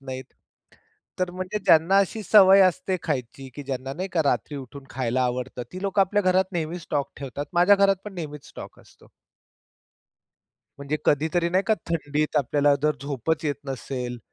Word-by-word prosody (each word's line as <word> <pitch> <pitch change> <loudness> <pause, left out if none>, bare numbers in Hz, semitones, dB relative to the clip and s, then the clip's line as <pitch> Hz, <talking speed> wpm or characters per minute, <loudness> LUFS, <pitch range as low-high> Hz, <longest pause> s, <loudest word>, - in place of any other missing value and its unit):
नाही. 130 -1 -6 1.0
तर 185 -1 0
म्हणजे 185 +3 -4
ज्यांना 165 +5 +5
अशी 205 +3 0
सवय 195 -1 +7
असते 185 0 +2
खायची, 135 -2 -4
की 145 - -7
ज्यांना 135 0 -4
नाही 185 +6 -4
का 165 -3 +2
रात्री 145 +1 0
उठून 135 +1 -9
खायला 130 0 -1
आवडतं, 125 0 -3
ती 185 - -7
लोकं 200 0 +1
आपल्या 205 +2 +2
घरात 185 +1 +2
नेहमी 170 +1 -3
स्टॉक 145 -3 -3
ठेवतात. 140 +1 -6
माझ्या 180 +4 +5
घरात 195 0 +4
पण 210 -2 -8
नेहमीच 150 -4 -7
स्टॉक - - -11
असतो. - - -21 1.7
म्हणजे 140 +2 -2
कधीतरी 160 +4 +2
नाही 185 +2 +2
का 220 - +4 0.2
थंडीत 150 -1 -1
आपल्याला 145 +1 +3
जर 150 0 +1
झोपच 145 +3 -2
येत 145 - 0
नसेल. 125 -2 -5
155 Hz, 165 wpm, -24 LUFS, 135-185 Hz, 1.7 s, सवय